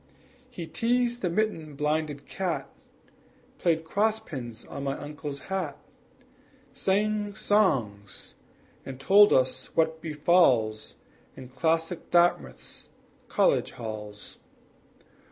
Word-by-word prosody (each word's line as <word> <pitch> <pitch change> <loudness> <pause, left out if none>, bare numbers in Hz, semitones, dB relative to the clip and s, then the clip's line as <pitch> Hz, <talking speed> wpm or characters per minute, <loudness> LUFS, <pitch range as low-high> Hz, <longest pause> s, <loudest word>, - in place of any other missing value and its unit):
He 180 -10 -7
teased 240 +5 0
the 180 - 0
mitten 165 -6 -1
blinded 150 -1 -1
cat, 185 -3 -3 0.9
Played 165 -3 +1
cross 215 +6 +1
pins 125 - -8
on 140 - -7
my 135 0 -2
uncle's 145 -1 -7
hat, 180 -4 -3 1.0
Sang 205 +1 0
songs, 125 - 0 0.5
and 135 -1 -8
told 200 +8 +6
us 130 0 +2
what 160 0 +1
befalls 150 -9 +2 0.4
In 130 -1 -10
classic 165 +5 -1
Dartmouth's 170 - +1 0.4
college - - +2
halls. 105 -2 -8
160 Hz, 100 wpm, -27 LUFS, 130-190 Hz, 1.0 s, told